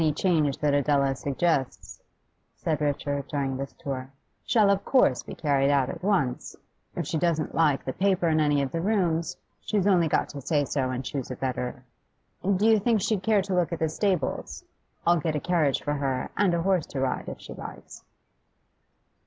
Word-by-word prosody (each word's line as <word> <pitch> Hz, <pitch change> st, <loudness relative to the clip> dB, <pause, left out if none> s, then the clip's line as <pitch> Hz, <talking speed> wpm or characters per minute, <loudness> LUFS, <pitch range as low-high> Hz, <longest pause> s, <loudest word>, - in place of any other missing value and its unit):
'Any 155 Hz, -2 st, +2 dB
change 155 Hz, -4 st, +1 dB
that 150 Hz, -1 st, +1 dB
Adela 140 Hz, -1 st, +2 dB
suggests,' 140 Hz, 0 st, -2 dB, 0.5 s
said 155 Hz, -3 st, -2 dB
Richard 145 Hz, -1 st, -1 dB
during 135 Hz, -2 st, -2 dB
this 135 Hz, +1 st, -6 dB
tour, 135 Hz, -1 st, -5 dB, 0.3 s
'shall 210 Hz, -4 st, +4 dB
of 200 Hz, 0 st, 0 dB
course 250 Hz, -, +3 dB
be -, -, -9 dB
carried 140 Hz, -3 st, +2 dB
out 140 Hz, -3 st, +2 dB
at -, -, -9 dB
once. 175 Hz, -11 st, 0 dB, 0.4 s
If 170 Hz, -, -2 dB
she 160 Hz, -, -1 dB
doesn't 165 Hz, -3 st, 0 dB
like 150 Hz, -4 st, +2 dB
the 130 Hz, -, -3 dB
paper 190 Hz, -1 st, +1 dB
in 155 Hz, -1 st, +2 dB
any 145 Hz, -2 st, +2 dB
of 135 Hz, -, -3 dB
the 165 Hz, -, -2 dB
rooms, 175 Hz, -5 st, 0 dB, 0.2 s
she's 205 Hz, -3 st, 0 dB
only 180 Hz, -5 st, +4 dB
got -, -, +1 dB
to 140 Hz, -, -7 dB
say 145 Hz, +1 st, +1 dB
so 130 Hz, -2 st, -1 dB
and 130 Hz, 0 st, -4 dB
choose 135 Hz, -4 st, -4 dB
a 130 Hz, -, -4 dB
better. 125 Hz, -1 st, -4 dB, 0.6 s
Do 200 Hz, +2 st, +1 dB
you 220 Hz, -1 st, +5 dB
think 225 Hz, +1 st, +2 dB
she'd 205 Hz, 0 st, 0 dB
care 210 Hz, -1 st, +2 dB
to 195 Hz, 0 st, -3 dB
look 180 Hz, -1 st, +1 dB
at 170 Hz, -, -2 dB
the 160 Hz, -1 st, 0 dB
stables? 180 Hz, -3 st, -2 dB, 0.4 s
I'll 170 Hz, 0 st, +4 dB
get 155 Hz, 0 st, -1 dB
a -, -, 0 dB
carriage 160 Hz, -5 st, +1 dB
for 145 Hz, -, -1 dB
her, 135 Hz, -3 st, -2 dB
and 190 Hz, -4 st, +2 dB
a 170 Hz, -, -1 dB
horse 185 Hz, -4 st, +1 dB
to 135 Hz, -, -5 dB
ride, 130 Hz, -1 st, -1 dB
if -, -, -8 dB
she -, -, -9 dB
likes. -, -, -10 dB
155 Hz, 195 wpm, -26 LUFS, 140-180 Hz, 0.6 s, you